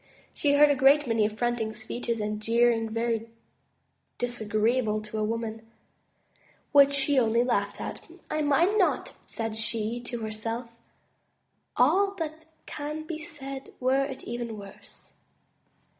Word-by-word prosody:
She 285 -1 +1
heard 295 0 +7
a - - +3
great 275 +3 +5
many 225 -3 +2
affronting 220 0 -2
speeches 230 +1 -4
and 210 0 -3
jeering 230 0 +2
very 230 0 -1 0.9
disagreeable 220 -1 0
to 215 +1 -5
a - - +1
woman, 225 0 -3 1.1
which 280 -1 +7
she 280 0 +3
only 230 0 +3
laughed 205 -5 -1
at. - - -5 0.3
"I 310 - -1
mind 335 +9 +3
not,'* 370 - +1
said 225 -2 -4
she 225 +1 -1
to 240 -1 -4
herself, 225 +2 -4 1.1
''all 385 +10 +4
that 320 -1 -5 0.2
can 300 +1 -5
be 315 0 -5
said, 275 -4 -7
were 265 +2 +2
it 270 -1 -7
even 235 -2 -5
worse. 200 -1 -12
240 Hz, 130 wpm, -27 LUFS, 220-280 Hz, 1.1 s, heard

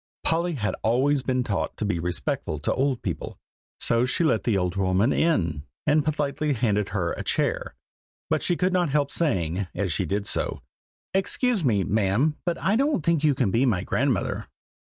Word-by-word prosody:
Polly 170 +2 +1
had 105 -8 -2
always 135 +5 +2
been 130 -1 0
taught 100 -5 -2
to 110 - -2
be 100 -5 -1
respectful 85 -2 -2
to 75 - -1
old 135 -2 0
people, - - -4 0.4
so 115 +1 +2
she 140 +7 0
let 155 -9 +2
the 110 -5 +2
old 90 -1 -1
woman 95 +5 +2
in, 85 - +1 0.2
and 150 0 +3
politely 150 -1 -1
handed 105 -5 0
her 90 -3 -1
a - - -5
chair; - - -1 0.5
but - - 0
she 175 - +1
could 185 0 +1
not 175 -3 +2
help 140 0 +1
saying, 95 - 0
as 95 -5 -1
she 95 - -1
did 100 +4 -1
so, - - -1 0.5
"excuse 205 +2 +1
me, 105 -8 +2
ma'am, 110 - +1
but 170 - +1
I 195 - +1
don't 275 - +1
think 165 -3 +2
you 150 -3 +4
can 100 - +1
be 115 +5 +2
my 105 -9 +1
grandmother." - - -1
125 Hz, 185 wpm, -25 LUFS, 100-155 Hz, 0.5 s, you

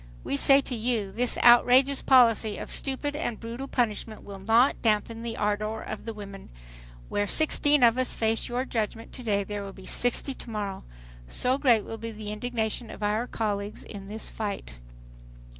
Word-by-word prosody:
"We - - -2
say 275 - +5
to 260 - -5
you, 225 -4 -1
this 245 +3 0
outrageous 250 +3 +6
policy 230 -5 +4
of - - -6
stupid 285 +2 -2
and 240 -7 -3
brutal 235 +4 -6
punishment 220 -3 -2
will 200 -1 -9
not 225 +7 +3
dampen 225 +1 0
the 230 -1 -5
ardor 215 +1 -1
of 215 - -7
the 225 - -5
women. 200 -2 -10 0.6
Where 205 0 -1
sixteen 295 -1 +4
of 235 +1 +5
us 255 - +1
face 225 +1 0
your 245 +2 -2
judgment 225 -2 -4
to - - -8
day 205 -4 0
there 205 +1 -5
will 195 0 -8
be 190 - -13
sixty 245 +3 +3
tomorrow, 210 -6 -6 0.4
so 255 - 0
great 235 -7 +3
will 225 - -8
be 230 +1 -5
the 215 -1 -7
indignation 220 0 -3
of - - -8
our 215 +4 0
colleagues 205 -3 -3
in 195 -2 -10
this 215 +2 -6
fight." 205 - -5
225 Hz, 175 wpm, -27 LUFS, 210-245 Hz, 0.6 s, outrageous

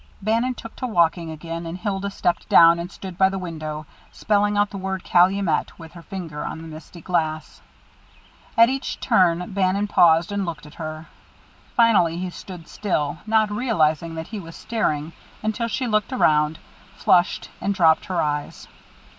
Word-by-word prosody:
Bannon 230 +5 0
took 230 0 -10
to 255 - -3
walking 170 -5 +1
again; 165 +2 -6
and 165 +2 -5
Hilda 200 0 -2
stepped 175 -3 -1
down 170 0 +7
and 175 +2 -5
stood 190 -3 -9
by 190 0 +5
the 195 - -4
window, 155 -4 -5 0.3
spelling 205 0 +1
out 205 0 +2
the 200 - -6
word 190 0 -3
"Calumet" 180 -1 +2
with 165 -1 -11
her 170 -1 -12
finger 165 -5 -6
on - - -5
the 165 - -9
misty 160 +2 -11
glass. 155 -3 -2 1.0
At 230 0 +8
each 270 +2 -3
turn, 180 -5 +2
Bannon 195 +1 +1
paused 170 -2 +4
and 200 -1 -1
looked 165 -4 -5
at 150 - -13
her. 155 0 -6 0.7
Finally 200 -8 +4
he 180 0 -4
stood 175 -2 -10
still, 155 -7 -2
not 215 -1 +3
realizing 165 - 0
that 160 0 -6
he 220 - -5
was 165 -3 -10
staring 160 -9 -2 0.3
until 220 +2 -1
she 255 +3 -2
looked 215 0 0
around, 155 -10 +2 0.4
flushed, 175 0 +2
and 200 - 0
dropped 165 -3 +4
her 185 -2 -2
eyes. 150 -1 -3
180 Hz, 170 wpm, -23 LUFS, 160-205 Hz, 1.0 s, At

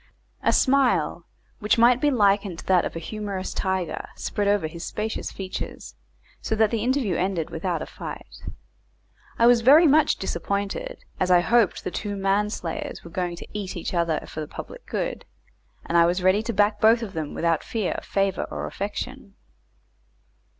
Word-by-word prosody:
A - - +3
smile, 270 -1 +2 0.3
which 210 0 +2
might 240 +2 +5
be 295 - +4
likened 200 -7 +2
to - - -10
that 185 -2 +3
of - - -5
a - - -3
humorous 200 +1 -5
tiger, 190 -3 -2
spread 205 -1 -2
over 205 -4 +2
his 165 +2 -6
spacious 220 +1 -3
features, 190 -1 -6 0.5
and - - -33
so 220 - -1
the 220 0 +2
interview 250 -7 +1
ended 180 -4 -1
without 170 0 -2
a - - -6
fight. - - -9 1.0
I 230 - +4
was 240 -1 +6
very 290 +8 +7
much 305 0 +4
disappointed, 200 +2 -3 0.2
as 185 - +1
I 180 -1 +6
hoped 230 +1 +2
the - - -3
two 205 +2 -4
man 195 +2 +1
slayers 170 -6 -5
were 170 - -11
going 175 0 -2
to - - -10
eat 200 -3 -4
each 170 - -4
other 170 -3 +1
for - - -8
the 155 - -4
public - - -9
good, - - -3 0.6
and 170 - -3
I 170 0 +6
was 180 +1 0
ready 185 +3 +4
to 230 - -3
back 210 0 +2
both 230 +2 +5
of 200 -4 -6
them 155 -3 -4
without 165 -2 +1
fear, 220 -6 -2
favour, 195 -1 0
or - - -4
affection. 210 +2 -5
200 Hz, 180 wpm, -24 LUFS, 180-225 Hz, 1.0 s, very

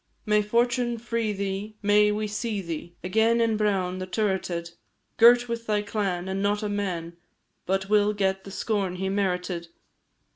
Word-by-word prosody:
May 210 -1 +3
fortune 240 +2 +1
free 230 -1 -2
thee 200 +1 -4
may 210 +1 +5
we 215 +1 -1
see 210 0 -2
thee 170 -1 -6
Again 220 +5 +2
in 230 -1 +2
Bràun, 190 -4 0
the 185 - -5
turreted, 185 -3 -1 0.5
Girt 240 +1 +7
with 230 0 -4
thy 210 -1 +1
clan! 195 -4 -2
And 190 +1 -2
not 205 +1 0
a 210 - -1
man 175 -5 -3 0.5
But 190 +1 0
will 210 0 +3
get 195 -2 0
the - - -9
scorn 195 -2 -1
he 190 +1 -2
merited. 180 -3 -1
205 Hz, 160 wpm, -26 LUFS, 190-215 Hz, 0.5 s, Girt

